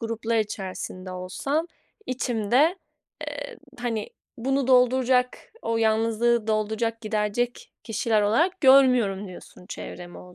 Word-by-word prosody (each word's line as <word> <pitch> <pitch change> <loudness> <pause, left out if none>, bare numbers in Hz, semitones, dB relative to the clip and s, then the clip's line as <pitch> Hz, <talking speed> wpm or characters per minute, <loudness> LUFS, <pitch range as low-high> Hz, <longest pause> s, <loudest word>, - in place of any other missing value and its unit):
gruplar 230 0 -2
içerisinde 190 -3 -5
olsam 230 - -2 0.4
içimde, 255 - +1 0.5
eee, - - -6 0.2
hani, 230 -3 -3 0.3
bunu 270 +2 0
dolduracak 250 0 +3 0.2
o 230 0 -1
yalnızlığı 225 +1 +2
dolduracak, 220 +1 -1
giderecek 215 +2 -2
kişiler 220 -1 +1
olarak 325 - +1
görmüyorum 250 -8 +5
diyorsun 180 0 -13
çevremi 175 -3 -8
o 180 0 -14
230 Hz, 105 wpm, -25 LUFS, 210-250 Hz, 0.5 s, görmüyorum